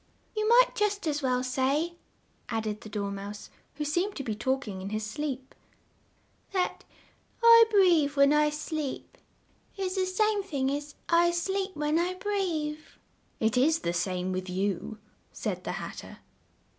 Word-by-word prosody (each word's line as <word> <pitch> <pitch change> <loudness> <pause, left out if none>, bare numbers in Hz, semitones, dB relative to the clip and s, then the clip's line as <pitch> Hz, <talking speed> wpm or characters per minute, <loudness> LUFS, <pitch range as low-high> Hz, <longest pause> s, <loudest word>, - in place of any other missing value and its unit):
"You 430 0 +1
might - - +6
just 415 -2 0
as 295 -1 0
well 255 -2 +1
say," 275 +6 0 0.6
added 215 -1 -2
the 215 - -10
Dor 200 -1 -3
mouse, 200 +1 -7 0.2
who 300 +1 -3
seemed 350 +7 0
to 275 - -4
be 225 - -2
talk 260 +4 -1
ing 190 -2 -5
in 195 - -5
his 215 0 -2
sleep, 265 +3 -4 1.0
"that 365 -2 -1 0.6
'I 460 0 +9
breathe 350 -9 +4
when 280 +1 +5
I 300 0 +4
sleep' 300 -1 -4 0.6
is 375 -1 -2
the 375 -1 0
same 420 +2 +1
thing 275 -8 -1
as 290 +1 -4
'I 345 0 +4
sleep 385 +3 -1
when 300 +2 +1
I 360 +2 0
breathe'!" 360 -7 -1 0.6
"It 220 -1 +1
is 315 +6 +3
the 170 - -1
same 180 0 -1
with 185 0 -3
you," 195 +3 -2 0.3
said - - -4
the - - -2
Hat - - -6
ter. - - -11
295 Hz, 160 wpm, -28 LUFS, 220-370 Hz, 1.0 s, I